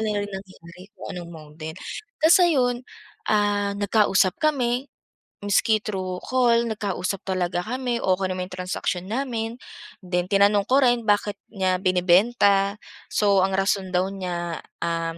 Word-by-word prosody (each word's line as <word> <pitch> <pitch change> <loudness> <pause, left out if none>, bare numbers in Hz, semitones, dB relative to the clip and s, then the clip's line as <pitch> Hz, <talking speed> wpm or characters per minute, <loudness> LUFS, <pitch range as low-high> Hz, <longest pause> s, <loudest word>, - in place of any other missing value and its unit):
na 210 -2 -1
rin 205 - -9
nangyari 185 -1 -11
kung - - -9
anong 175 -1 -7
model, 155 -1 -9 0.5
tapos 325 +2 +8
ayun, 265 -9 +3 0.5
ah, 205 -1 +1
nagkausap 200 -2 +2
kami 260 -4 0 0.5
miski 210 +2 +2
thru 185 -4 -4
call 240 -2 +2
nagkausap 195 -3 -3
talaga 180 -2 -1
kami, 250 +1 -2
okey 190 -3 0
naman 185 0 -3
'yong 185 - -12
transaction 180 0 -3
namin, 230 -2 -3 0.5
then 180 0 -1
tinanong 200 0 +4
ko 260 - +5
rin 245 -3 +3
bakit 205 -1 +1 0.2
niya 185 -3 0
binebenta 195 +2 +3 0.3
so 200 -2 +3
ang 190 0 +1
rason 195 0 0
daw 180 0 +1
niya, 175 -3 -4 0.2
um, 165 0 -2
200 Hz, 140 wpm, -24 LUFS, 180-225 Hz, 0.5 s, tapos